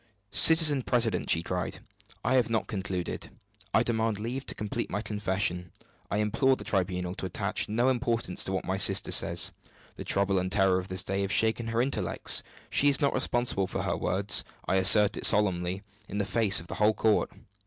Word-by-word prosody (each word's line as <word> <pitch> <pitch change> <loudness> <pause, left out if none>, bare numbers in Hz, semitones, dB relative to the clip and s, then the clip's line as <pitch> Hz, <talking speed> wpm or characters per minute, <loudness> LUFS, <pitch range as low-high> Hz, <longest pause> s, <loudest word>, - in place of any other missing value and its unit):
"Citizen 160 -4 +6
president," 120 -2 -1
he 85 - +2
cried, 90 0 -4 0.5
"I - - 0
have 125 -3 +2
not 115 -1 -1
concluded. 95 -3 -5 0.4
I 110 - +2
demand 110 -2 -1
leave 120 +6 -5
to - - -4
complete 105 +2 -4
my 105 +2 -4
confession. 95 -4 -3 0.4
I 100 - -2
implore 115 +6 +1
the - - -10
tribunal 90 -2 -2
to 95 - -6
attach 90 - -2
no 120 +4 0
importance 120 -7 -1
to - - -3
what 95 - -3
my 95 +1 -2
sister 95 0 +3
says. - - +2 0.5
The - - -7
trouble 100 -1 0
and 95 +1 -4
terror 95 -2 +2
of 90 - -8
this 95 0 -1
day 95 +1 -3
have 100 0 -3
shaken 110 +3 +1
her 115 +1 0
intellects. 135 - +1 0.3
She 145 - +3
is 140 - +3
not 140 - 0
responsible 120 -6 -1
for - - -4
her - - -2
words 95 +3 +2 0.2
I 95 - +1
assert 100 +2 +5
it - - -6
solemnly, 95 -2 0 0.2
in 100 - -6
the 100 - -1
face 110 -1 +2
of 80 - -11
the - - -8
whole 105 +1 +3
court!" 110 -2 +1
105 Hz, 195 wpm, -27 LUFS, 95-115 Hz, 0.5 s, Citizen